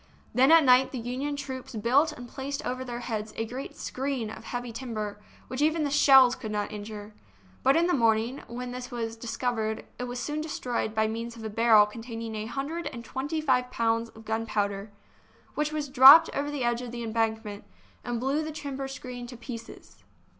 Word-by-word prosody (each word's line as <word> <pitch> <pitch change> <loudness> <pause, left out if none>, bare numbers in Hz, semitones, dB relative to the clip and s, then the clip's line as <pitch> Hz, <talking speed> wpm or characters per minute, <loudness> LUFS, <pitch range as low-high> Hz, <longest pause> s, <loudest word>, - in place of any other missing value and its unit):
Then 265 +4 +5
at 330 -1 +8
night 255 0 +5
the 265 - -5
Union 255 +5 -3
troops 265 -3 -6
built 260 +9 +3
and 245 -5 -9
placed 280 +3 -5
over 255 +1 -2
their 240 -1 -5
heads 220 -3 -4
a 225 - -1
great 255 +4 -7
screen 260 -4 -3
of - - -10
heavy 245 -1 -4
timber, 220 -4 -5 0.3
which 255 +2 -4
even 310 +1 +2
the 285 - -1
shells 270 -3 +7
could 215 - -6
not 210 -1 -2
injure. 210 0 -8 0.5
But 270 +4 +4
in 335 - +3
the 355 - +1
morning, 230 +1 +2
when 245 +1 -6
this 250 0 -6
was 230 -3 -4
discovered, 225 -1 -2
it 250 - -2
was 245 0 -5
soon 300 +4 -3
destroyed 245 -7 -3
by 220 0 +3
means 230 +2 -5
of 225 - -10
a 220 - -4
barrel 220 -1 +6
containing 225 +1 -7
a 215 0 -4
hundred 285 +8 -4
and 235 -2 -7
twenty 290 +6 -3
five 250 -4 +2
pounds 230 -1 0
of 225 0 -15
gunpowder, 210 -2 -2 0.6
which 300 0 -1
was 305 -1 -2
dropped 270 +4 +9
over 285 +1 -1
the 290 -3 -3
edge 240 0 0
of 245 -2 -6
the 240 0 -5
embankment, 220 -2 -2 0.4
and 240 -1 -3
blew 270 +5 0
the 315 0 -4
timber 275 -3 -5
screen 250 -2 -7
to 245 0 -10
pieces. 230 -1 -10
245 Hz, 195 wpm, -28 LUFS, 225-270 Hz, 0.6 s, dropped